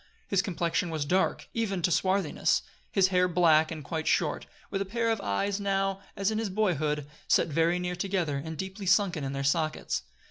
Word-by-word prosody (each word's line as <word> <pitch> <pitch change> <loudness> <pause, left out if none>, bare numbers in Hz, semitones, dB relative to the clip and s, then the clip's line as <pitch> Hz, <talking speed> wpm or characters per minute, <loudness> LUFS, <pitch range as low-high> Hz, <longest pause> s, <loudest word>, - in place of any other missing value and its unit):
His 195 -2 +2
complexion 175 -4 -1
was 155 -3 -2
dark, 185 +6 +1
even 200 -6 -1
to 175 - +2
swarthiness; 190 +3 +1 0.3
his 190 -2 +4
hair 180 -1 +3
black 160 -3 +4
and 155 -2 -6
quite 160 +4 -4
short, - - +1 0.2
with 195 - -1
a - - +2
pair 230 +4 0
of 225 - -1
eyes 195 - -1
now, 195 -1 0 0.2
as 200 +2 +1
in 220 - -1
his 225 -2 -1
boyhood, 155 -8 0 0.2
set - - +3
very 165 +3 +2
near 180 0 -2
together 180 -6 -1
and 160 -1 -6
deeply 190 +2 -5
sunken 180 -5 +3
in 135 0 -3
their 140 0 -2
sockets. 155 - 0
180 Hz, 190 wpm, -28 LUFS, 160-195 Hz, 0.3 s, his